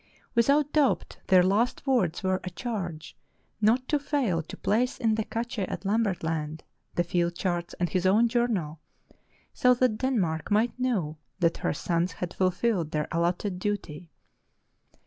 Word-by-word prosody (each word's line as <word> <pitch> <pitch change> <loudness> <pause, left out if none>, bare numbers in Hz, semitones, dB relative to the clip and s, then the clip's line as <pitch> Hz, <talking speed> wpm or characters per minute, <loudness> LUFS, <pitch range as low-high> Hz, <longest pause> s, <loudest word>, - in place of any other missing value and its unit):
Without 280 +5 +3
doubt 295 -4 +1
their 185 -1 +6
last 210 +9 +1
words 230 - +1
were 185 0 +1
a 180 - -4
charge 180 -6 -5 0.5
not 240 +5 +3
to 295 - +1
fail 270 - 0
to 160 - -10
place 245 +5 +1
in 225 -4 +1
the 220 0 0
cache 235 +2 -4
at 195 +1 -3
Lam 215 +4 +2
bert 195 -7 -1
Land 155 -1 -3 0.3
the 175 - +2
field 175 0 0
charts 175 -1 -2
and 175 - 0
his 185 +1 0
own 215 +5 +5
journal, 220 -11 -1 0.7
so 250 0 +4
that 245 -3 +1
Denmark 190 -12 0
might 220 +4 +1
know 185 -12 -1 0.2
that 170 -3 +1
her - - -1
sons 170 0 0
had 175 +1 -5
fulfilled 185 -2 +1
their 150 -1 -1
allotted 175 +3 -1
duty. 180 -5 -4
190 Hz, 160 wpm, -27 LUFS, 170-235 Hz, 0.7 s, their